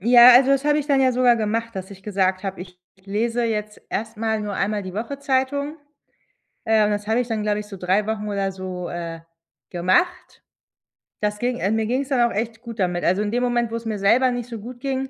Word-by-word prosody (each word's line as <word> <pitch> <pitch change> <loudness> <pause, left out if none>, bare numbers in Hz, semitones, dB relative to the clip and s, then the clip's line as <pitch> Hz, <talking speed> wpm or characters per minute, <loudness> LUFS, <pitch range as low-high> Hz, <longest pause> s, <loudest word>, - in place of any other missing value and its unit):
Ja, 240 +3 +8
also, 265 +2 +6
das 275 0 +2
habe 295 0 +3
ich 295 - -3
dann 280 -2 +3
ja 260 -1 +4
sogar 245 -1 +4
gemacht, 225 +1 -2
dass 190 +1 -6
ich 195 -1 -12
gesagt 190 -2 0
habe: 195 -2 -5
„Ich 180 -1 -11 0.3
lese 230 +4 -1
jetzt 215 -2 -3
erstmal 220 0 -2
nur 205 -1 -4
einmal 205 +1 -1
die 185 -1 -8
Woche 235 +7 -4
Zeitung.“ 280 +2 -1 0.9
Äh, 220 -1 +4
und 210 - +1
das 205 0 -2
habe 225 +2 +2
ich 245 - -3
dann, 220 -2 -2
glaube 210 0 0
ich 210 - -9
so 200 - -9
3 190 +4 +1
Wochen 210 -1 -3
oder 195 -1 -1
so, 185 -2 -6
äh, 170 -1 -5 0.5
gemacht. 185 - 0 0.8
Das 210 0 0
ging 245 +1 -1
ähm, 200 +4 +1
mir 220 -1 0
ging's 265 +3 -1
dann 240 -3 +3
auch - - -6
echt 225 +1 -3
gut 230 -2 -9
damit. 180 -1 0
Also, 185 +4 +2
in 210 0 -1
dem 245 +1 0
Moment, 240 -2 0
wo - - -3
es 230 0 -5
mir 215 -2 -2
selber 250 +6 +4
nicht 245 0 -4
so 230 -2 -6
gut 245 +3 -9
ging, 265 0 -2
220 Hz, 235 wpm, -22 LUFS, 200-245 Hz, 0.9 s, Ja